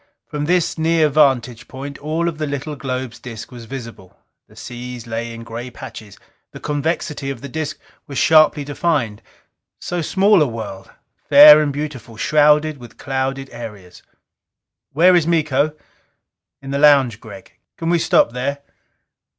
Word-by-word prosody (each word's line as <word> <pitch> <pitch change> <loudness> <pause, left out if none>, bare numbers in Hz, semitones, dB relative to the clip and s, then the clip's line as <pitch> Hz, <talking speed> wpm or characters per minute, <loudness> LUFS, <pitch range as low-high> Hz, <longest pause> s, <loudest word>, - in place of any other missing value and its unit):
From 150 -1 -4
this 175 0 0
near 160 -1 +2
vantage 125 -5 +1
point, 140 +2 -8
all 160 +3 -2
of 160 -2 -4
the 155 - -2
little 145 +1 -4
globe's 130 -3 -5
disc 115 -3 -9
was 120 -2 -10
visible. 115 -7 -10 0.3
The - - -21
seas 125 -1 -8
lay 115 0 -4
in 115 0 -9
gray 120 +2 -7
patches. 110 -3 -11 0.4
The - - -9
convexity 150 -1 -3
of 135 - -6
the 140 - -7
disc 155 +2 -4 0.3
was 140 - -7
sharply 155 -2 +4
defined. 140 -7 -1 0.6
So 175 -1 -4
small 195 +3 +3
a 150 - +3
world! 105 -5 -7 0.4
Fair 150 +1 +10
and 150 -2 0
beautiful, 135 -6 -6
shrouded 150 +2 +3
with 120 -1 -13
clouded 135 0 -3
areas. 105 -7 -10 0.9
"Where 180 +5 +5
is 170 -2 +2
Miko?" 155 -3 +1 0.9
"In 135 - -7
the 140 - -1
lounge, 140 -7 +4
Gregg?" 105 -4 -13 0.2
"Can 165 0 -2
we 170 - +3
stop 140 - +3
there?" 130 +4 -3
140 Hz, 150 wpm, -19 LUFS, 120-155 Hz, 0.9 s, Fair